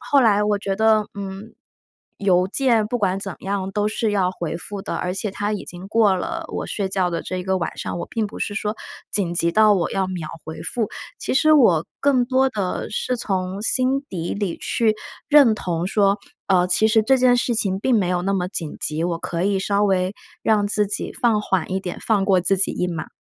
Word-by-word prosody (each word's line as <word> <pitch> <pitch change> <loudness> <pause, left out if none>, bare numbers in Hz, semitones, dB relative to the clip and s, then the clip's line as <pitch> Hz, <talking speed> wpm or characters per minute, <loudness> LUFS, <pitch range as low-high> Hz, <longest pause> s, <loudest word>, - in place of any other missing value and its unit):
后 280 - +3
来 210 -4 +4
我 210 0 +1
觉 200 -1 -2
得， 215 0 +3
嗯， 200 +2 -7 0.7
邮 185 -2 +3
件 230 -1 +2
不 245 +3 -2
管 195 -3 +1
怎 195 -2 -6
样 195 -1 -2
都 210 0 +1
是 220 0 -1
要 190 -3 +2
回 170 -3 -4
复 200 +3 -7
的， - - -4
而 180 - -2
且 200 +2 -3
它 205 +2 -2
已 205 - -4
经 180 +1 -9
过 215 -2 +4
了 185 - -3
我 - - -4
睡 200 -2 -2
觉 190 -2 0
的 170 - -2
这 185 - -4
一 - - -3
个 190 +1 0
晚 170 - -4
上， - - -4
我 170 - -4
并 220 -2 -2
不 - - -9
是 205 - -3
说 210 0 -2 0.3
紧 180 -4 -1
急 170 0 +1
到 215 +2 +5
我 175 -3 0
要 190 -1 0
秒 180 -4 -5 0.2
回 160 0 -7
复。 225 -4 -2 0.3
其 - - -2
实 310 +3 +5
我 190 - +5 0.2
更 270 -3 +3
多 260 +1 +2
的 200 -7 -3
是 250 +4 -1
从 190 -3 -2
心 260 +4 +1
底 170 -2 -3
里 200 -4 -2
去 220 -2 +1 0.3
认 285 -6 +7
同 175 -4 -2
说， 200 0 +2 0.3
呃， 180 -2 +3
其 185 +4 +3
实 220 0 +4
这 265 +5 +4
件 250 -1 +5
事 245 0 0
情 195 -3 0
并 255 +3 +2
没 185 -3 0
有 180 -1 0
那 195 +2 0
么 185 -2 0
紧 165 -5 -4
急， 155 +1 -1
我 170 -1 -1
可 170 0 -3
以 195 0 +1
稍 200 +1 +1
微 190 -1 +1 0.3
让 210 -2 +2
自 210 0 +1
己 200 - -4
放 230 -3 +2
缓 190 -4 -1
一 190 - 0
点， 180 -2 -5
放 210 -3 +1
过 190 -2 +3
自 190 +3 +2
己 195 - +2
一 180 - -1
马。 170 -3 -4
200 Hz, 245 characters per minute, -22 LUFS, 185-220 Hz, 0.7 s, 认